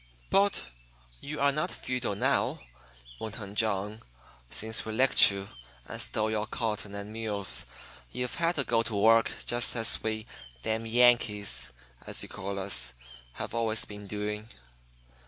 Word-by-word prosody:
"But 200 0 +2 0.5
you 150 +1 -7
are 140 0 +3
not 150 +2 -1
feudal, 125 -5 -4
now," - - 0 0.6
went 110 0 -6
on 100 -2 -9
John. 105 0 -1 0.5
"Since 110 - +2
we 110 - -6
licked 130 +4 +6
you 100 -1 -5 0.4
and - - -4
stole 110 0 -1
your 110 0 -2
cotton 105 -3 -4
and 100 +1 -7
mules 105 -4 +5 0.4
you've 125 - -4
had 170 +1 0
to 140 - +1
go 115 -2 +1
to 115 -2 -4
work 115 +3 +4 0.2
just 120 +1 +2
as 115 -1 +2
we 110 0 -3 0.4
'damyankees,' 110 - +2 0.4
as - - +1
you - - -10
call 100 +1 -6
us, 95 -10 +1 0.4
have - - -6
always 115 -2 0
been 105 -1 -10
doing. 105 +1 -5
110 Hz, 145 wpm, -28 LUFS, 105-120 Hz, 0.6 s, licked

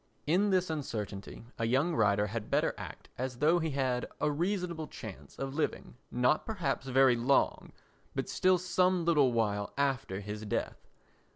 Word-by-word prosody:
In 185 +7 +3
this 185 -3 +2
uncertainty 110 -9 -5
a 115 - +1
young 135 +8 +2
writer 105 -5 +3
had 105 +1 -5
better - - +2
act - - -9
as 125 -1 -3
though 160 +6 +4
he 160 -1 -1
had 130 -3 0
a 150 - +1
reasonable 170 0 -2
chance 105 -4 -10
of 135 0 -4
living, 155 -5 -2
not 125 +5 +2
perhaps 160 -11 -2
very 130 -1 +5
long, 125 +4 +1 0.4
but - - -2
still 185 0 +3
some 180 0 +2
little 150 -6 +4
while 105 -3 0
after 135 -9 0
his 105 +1 -6
death. 105 - -3
135 Hz, 160 wpm, -31 LUFS, 115-170 Hz, 0.4 s, very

